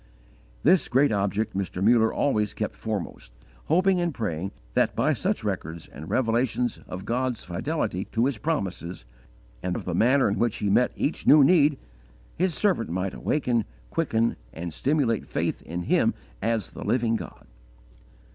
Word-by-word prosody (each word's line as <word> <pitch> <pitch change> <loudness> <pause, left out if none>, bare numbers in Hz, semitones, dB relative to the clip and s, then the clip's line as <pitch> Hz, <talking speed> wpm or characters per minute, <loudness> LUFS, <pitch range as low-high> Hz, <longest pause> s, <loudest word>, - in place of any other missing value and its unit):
_ - - -29 0.6
This 175 +4 +4
great 135 +2 +3
object 100 +1 0
Mr. 95 -2 -3
Muller 110 +2 +4
always 105 -7 0
kept 105 - -3
foremost, 105 - -5 0.3
hoping 185 +3 +3
and 175 -1 0
praying 100 - -3 0.2
that, - - +2
by - - +2
such - - -1
records 80 +1 -4
and 80 +3 -10
revelations 120 0 0
of 90 +1 -7
God's 125 0 -1
fidelity 95 - -2
to 115 +1 0
His 130 -5 -1
promises, 95 - -3 0.6
and 90 -1 -2
of - - -5
the 90 - -2
manner 125 +9 +4
in 105 - -1
which 120 -2 +1
He 105 -2 -1
met 125 +5 +4
each 150 - -2
new 150 -1 +8
need, 150 -2 +5 0.6
his 180 -2 0
servant 190 - +1
might 95 +2 -2
awaken, 125 -6 0 0.3
quicken, 115 +1 +1
and 85 0 -6
stimulate 130 - +1
faith - - -2
in 85 +2 -5
Him - - +2 0.3
as 110 -4 -1
the - - -8
Living 120 -2 +1
God. - - -7
115 Hz, 160 wpm, -26 LUFS, 95-140 Hz, 0.6 s, new